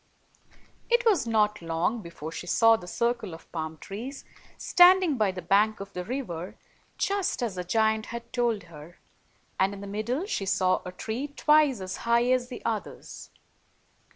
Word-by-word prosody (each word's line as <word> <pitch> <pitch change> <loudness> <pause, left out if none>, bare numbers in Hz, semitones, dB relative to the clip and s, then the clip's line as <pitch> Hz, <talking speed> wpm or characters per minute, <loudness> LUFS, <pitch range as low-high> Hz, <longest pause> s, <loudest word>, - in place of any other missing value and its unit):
It 480 +1 +3
was 380 - +3
not 210 -2 +1
long 165 +7 -1
before 170 -3 -8
she 175 - -7
saw 225 +5 +5
the 180 -5 -8
circle 235 -3 -1
of 165 - -17
palm 160 -1 -4
trees, 235 - -8 0.3
standing 360 -3 +5
by 215 -5 +1
the 185 -2 -8
bank 210 +5 +3
of 195 0 -8
the 180 - -4
river, 185 -7 -5 0.4
just 395 -9 -1
as 230 -5 -1
the 180 -1 -4
giant 220 +3 +1
had 235 0 -8
told 235 -5 0
her; 165 0 -13 0.6
and 195 +1 +2
in 200 - -10
the - - -7
middle 215 - -2
she 200 - -3
saw 185 -1 +2
a - - -5
tree 225 +9 -4
twice 295 -4 +3
as 185 0 -5
high 235 +1 +2
as 255 -1 +1
the 250 - -9
others. 225 -3 -5
220 Hz, 170 wpm, -27 LUFS, 185-245 Hz, 0.6 s, saw